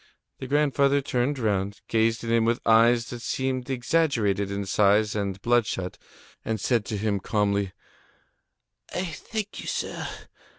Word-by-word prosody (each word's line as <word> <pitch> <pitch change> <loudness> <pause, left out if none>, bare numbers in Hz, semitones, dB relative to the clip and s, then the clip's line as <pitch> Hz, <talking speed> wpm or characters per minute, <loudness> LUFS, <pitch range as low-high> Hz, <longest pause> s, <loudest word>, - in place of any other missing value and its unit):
The 130 - -6
grandfather 140 0 +3
turned 135 +1 -1
round, 100 -4 -1
gazed 115 0 +1
at 115 - -2
him 115 -1 +4
with 115 +1 +1
eyes 115 +1 +4
which 120 -1 -6
seemed 130 0 -2
exaggerated 120 - +1
in 100 0 -3
size 105 +2 +3
and 100 -2 -2
bloodshot, 115 -6 0 0.4
and 110 -1 -2
said 115 +1 +1
to 105 - -3
him 100 -1 0
calmly: 100 -1 0 1.2
"I 180 - -1
thank 205 +7 -5
you, - - -9
sir. - - -3
115 Hz, 140 wpm, -26 LUFS, 100-130 Hz, 1.2 s, him